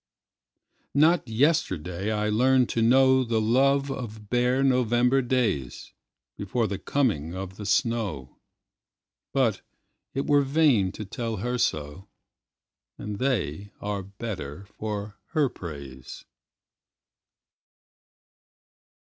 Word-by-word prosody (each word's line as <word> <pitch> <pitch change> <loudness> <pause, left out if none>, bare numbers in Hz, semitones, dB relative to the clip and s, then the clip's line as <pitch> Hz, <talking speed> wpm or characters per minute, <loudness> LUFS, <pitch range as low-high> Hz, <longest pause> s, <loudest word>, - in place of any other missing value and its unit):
Not 155 0 +4
yesterday 110 - 0
I 105 0 0
learned 125 +3 +3
to 115 - 0
knowThe 130 -1 +4
love 135 +5 +2
of 110 -5 -7
bare 125 +2 +2
November 125 0 +3
daysBefore 110 - -3
the 100 -1 -4
coming 95 - 0
of 95 0 -6
the 105 - -6
snow; 100 - -1 0.9
But 125 -6 +1 0.5
it 135 - -1
were 145 -1 +4
vain 135 -9 +3
to 105 - -6
tell 115 +3 -4
her 125 +5 -2
so, 75 +2 -2 0.9
And 105 -1 -6
they 100 - -1
are 105 -1 -3
better 100 -5 -7
for 105 0 -6 0.2
her 150 -4 +3
praise. 70 - -9
110 Hz, 100 wpm, -26 LUFS, 95-130 Hz, 0.9 s, Not